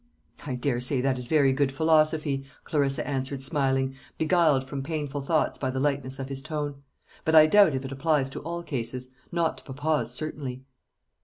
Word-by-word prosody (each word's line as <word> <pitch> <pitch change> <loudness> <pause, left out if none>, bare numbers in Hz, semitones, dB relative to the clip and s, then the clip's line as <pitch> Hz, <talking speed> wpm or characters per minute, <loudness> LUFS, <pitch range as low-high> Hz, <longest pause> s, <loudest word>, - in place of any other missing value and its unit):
"I 130 - -2
daresay 125 +1 0
that 130 -1 +1
is 125 - -4
very 140 -3 +4
good 135 0 +1
philosophy," 155 -1 +2 0.2
Clarissa 140 -3 0
answered, 135 -1 -3
smiling, 135 -2 +1 0.2
beguiled 160 -4 +3
from 135 +1 -5
painful 145 -1 -3
thoughts 155 +3 0
by 130 - -1
the 130 0 -2
lightness 135 -2 -1
of 135 - -5
his 135 -1 -4
tone; 145 -2 -4 0.4
"but 160 - +2
I 155 -1 +10
doubt 170 -2 +5
if 130 +1 -3
it 135 - -6
applies 135 -1 +1
to - - -5
all 170 +2 -5
cases 125 -3 -4 0.2
not 170 -2 0
to - - -20
papa's, 145 +2 -1
certainly." 140 -5 -5
140 Hz, 175 wpm, -27 LUFS, 135-155 Hz, 0.4 s, I